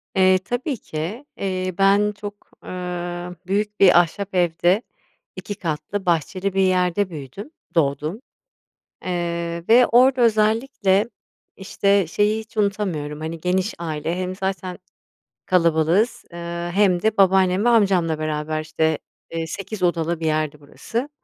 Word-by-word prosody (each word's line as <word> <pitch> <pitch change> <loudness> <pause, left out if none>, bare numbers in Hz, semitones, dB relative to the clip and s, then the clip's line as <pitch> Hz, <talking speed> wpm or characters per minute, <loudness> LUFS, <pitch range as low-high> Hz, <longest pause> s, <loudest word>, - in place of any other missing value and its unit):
Eee, 185 0 +5
tabii 245 - -3
ki, 190 - -5
eee, 185 -1 -2
ben 200 +2 +4
çok, 205 0 -10
ııı, 180 -1 -5
büyük 210 +2 -1
bir 180 -3 +7
ahşap 190 +3 -2
evde 175 +4 +2 0.5
2 205 - -6
katlı 180 +4 -4
bahçeli 180 +3 0
bir 195 - +2
yerde 185 +1 +2
büyüdüm, 160 - -8 0.2
doğdum. 155 - 0 0.8
Eee, 170 -1 -3
ve 245 +2 +7
orada 255 +2 +4
özellikle, 220 -2 +2 0.5
işte, 200 -1 +1
şeyi, 210 +6 +1
hiç 220 0 -15
unutamıyorum, 185 -8 -1
hani, 160 +1 -5
geniş 185 +4 0
aile 165 +1 -3
hem 185 0 -3
zaten 190 -2 -3 0.7
kalabalığız, 175 +7 +2
eee, 170 0 -5
hem 190 -3 +3
de 220 -1 +1
babaannem 190 +1 +4
ve - - +5
amcamla 185 -8 +3
beraber, 155 0 -2
işte, 155 0 0 0.3
eee, 165 -1 -3
8 195 +3 -6
odalı 170 -1 0
bir 165 - -3
yerdi 155 -1 -1
burası. 230 - -5
185 Hz, 130 wpm, -22 LUFS, 170-205 Hz, 0.8 s, bir